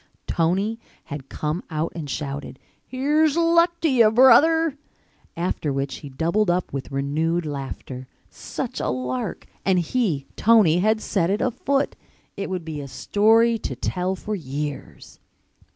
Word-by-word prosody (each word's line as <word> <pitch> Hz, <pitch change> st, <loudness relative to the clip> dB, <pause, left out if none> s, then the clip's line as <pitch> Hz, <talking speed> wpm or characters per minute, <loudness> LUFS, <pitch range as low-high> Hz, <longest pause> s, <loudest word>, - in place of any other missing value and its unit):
Tony 195 Hz, +7 st, 0 dB, 0.2 s
had 145 Hz, -2 st, -8 dB
come 155 Hz, +4 st, -3 dB
out 155 Hz, 0 st, -2 dB
and 155 Hz, -4 st, -6 dB
shouted, 140 Hz, -1 st, -5 dB, 0.3 s
"Here's 295 Hz, +4 st, +2 dB
luck 335 Hz, +1 st, +3 dB
to 330 Hz, -, +3 dB
you, 240 Hz, -6 st, +5 dB
brother," 280 Hz, +7 st, +5 dB, 0.6 s
after 170 Hz, -3 st, -1 dB
which 135 Hz, 0 st, -2 dB
he 145 Hz, -, -9 dB
doubled 170 Hz, +9 st, 0 dB
up 175 Hz, -3 st, 0 dB
with 135 Hz, 0 st, -5 dB
renewed 155 Hz, +5 st, 0 dB
laughter. 135 Hz, -3 st, -6 dB, 0.2 s
Such -, -, -6 dB
a -, -, -1 dB
lark! 125 Hz, 0 st, -3 dB, 0.2 s
And 190 Hz, -1 st, +3 dB
he, 175 Hz, -, 0 dB
Tony, 210 Hz, -7 st, +5 dB
had 215 Hz, +3 st, +2 dB
set 185 Hz, -6 st, 0 dB
it 205 Hz, +2 st, +1 dB
afoot! 275 Hz, +3 st, 0 dB, 0.4 s
It 200 Hz, -, -4 dB
would 180 Hz, -3 st, -4 dB
be 155 Hz, -2 st, -5 dB
a 140 Hz, -, -7 dB
story 225 Hz, -, +3 dB
to -, -, -4 dB
tell 185 Hz, +1 st, -2 dB
for 215 Hz, +3 st, -5 dB
years. 145 Hz, -3 st, -6 dB
180 Hz, 145 wpm, -23 LUFS, 145-230 Hz, 0.6 s, you